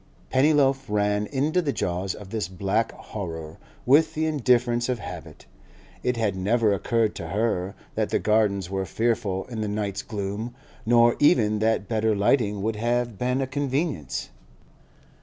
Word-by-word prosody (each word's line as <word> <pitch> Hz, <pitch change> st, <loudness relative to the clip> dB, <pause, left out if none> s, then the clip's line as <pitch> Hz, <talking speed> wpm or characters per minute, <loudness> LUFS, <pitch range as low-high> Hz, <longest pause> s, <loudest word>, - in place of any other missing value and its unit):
Pennyloaf 135 Hz, -1 st, +3 dB
ran 105 Hz, 0 st, +1 dB
into 150 Hz, +6 st, +1 dB
the 150 Hz, -5 st, -1 dB
jaws 90 Hz, -4 st, -2 dB
of 100 Hz, -2 st, -11 dB
this 110 Hz, -6 st, -2 dB
black 100 Hz, +4 st, -1 dB
horror 80 Hz, -6 st, -7 dB, 0.3 s
with 155 Hz, +5 st, +4 dB
the 160 Hz, +1 st, 0 dB
indifference 120 Hz, -5 st, +2 dB
of 125 Hz, -, 0 dB
habit; 90 Hz, -5 st, -9 dB, 0.6 s
it 125 Hz, -1 st, 0 dB
had 105 Hz, -4 st, 0 dB
never 105 Hz, +3 st, +2 dB
occurred 115 Hz, +2 st, +1 dB
to 85 Hz, -, -5 dB
her 100 Hz, -1 st, -1 dB, 0.2 s
that -, -, -1 dB
the -, -, +2 dB
Gardens 105 Hz, -4 st, +1 dB
were 95 Hz, 0 st, -3 dB
fearful 110 Hz, -5 st, -1 dB
in 115 Hz, -3 st, -5 dB
the 105 Hz, -, -1 dB
night's 100 Hz, -1 st, -2 dB
gloom, 105 Hz, +3 st, -4 dB, 0.3 s
nor 120 Hz, 0 st, +5 dB
even 110 Hz, -9 st, +4 dB
that 110 Hz, -2 st, +1 dB
better 110 Hz, -1 st, +1 dB
lighting 105 Hz, -1 st, +1 dB
would 110 Hz, 0 st, -1 dB
have 120 Hz, -1 st, -1 dB
been 125 Hz, +2 st, 0 dB
a -, -, +1 dB
convenience. 135 Hz, -, -2 dB
110 Hz, 155 wpm, -25 LUFS, 100-125 Hz, 0.6 s, nor